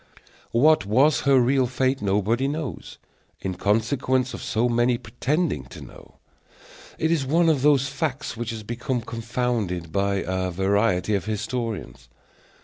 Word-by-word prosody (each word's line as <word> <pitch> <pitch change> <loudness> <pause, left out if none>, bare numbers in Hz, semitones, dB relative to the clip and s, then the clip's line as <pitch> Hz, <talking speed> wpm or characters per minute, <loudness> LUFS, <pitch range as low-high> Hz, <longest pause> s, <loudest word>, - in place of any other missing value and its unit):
What 150 +3 +4
was 135 +8 +4
her 135 -1 +6
real 130 +1 +3
fate 130 +1 0
nobody 105 +6 +1
knows, 150 -1 -5 0.4
in 95 - -3
consequence 125 +6 0
of - - -7
so 115 +2 0
many 120 +1 +2
pretending 135 - -2
to 65 - -12
know. - - -14 0.8
It 160 - 0
is 160 -4 +1
one 165 +5 +3
of 150 -5 +2
those 140 -1 +4
facts 140 0 -3
which 120 0 -4
have 110 -2 -6
become 120 +2 -2
confounded 115 -7 -3
by 100 +1 0
a 95 0 -1
variety 95 +2 +1
of 100 - 0
historians. 110 - -4
120 Hz, 140 wpm, -24 LUFS, 100-135 Hz, 0.8 s, her